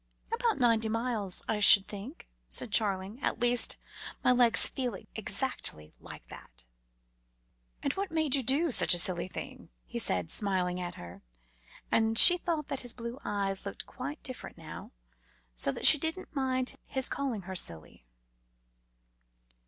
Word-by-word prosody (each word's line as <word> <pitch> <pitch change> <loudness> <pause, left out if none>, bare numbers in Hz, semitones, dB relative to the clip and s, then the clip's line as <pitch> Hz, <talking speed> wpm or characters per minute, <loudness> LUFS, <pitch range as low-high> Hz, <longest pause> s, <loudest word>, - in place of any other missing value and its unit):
"About 465 -2 -1
ninety 230 -3 +1
miles, 225 -4 -2
I 220 - -2
should 200 -1 +8
think," 215 - -10 0.2
said 230 - +2
Charling; 200 +2 -1
"at - - -2
least, 240 0 +4 0.5
my - - +4
legs 245 -2 +4
feel 250 -5 -3 0.2
exactly 200 - -4
like - - -12
that." - - -12 1.2
"And 280 - -1
what 395 0 -4
made 315 -4 -1
you 275 - +1
do 280 +6 -1
such 205 - +3
a - - -1
silly 175 0 +2
thing?" - - -9 0.2
he - - -6
said, 90 -3 0
smiling 185 -3 -1
at 175 -1 -6
her, 85 0 -12 0.7
and 225 0 +1
she 355 +8 +9
thought 325 -5 -4
his 245 -2 -3
blue 235 +2 -8
eyes 195 -2 -3
looked 200 - -7
quite 280 +4 -8
different 255 -2 -9
now, - - -10 0.6
so 100 - 0
that - - -3
she 305 - +11
did 320 +4 -3
not 370 - -12
mind 260 -2 -2
his 265 -1 +1
calling 255 -8 -4
her 190 +1 -8
silly. 80 - -3
230 Hz, 150 wpm, -29 LUFS, 190-265 Hz, 1.2 s, she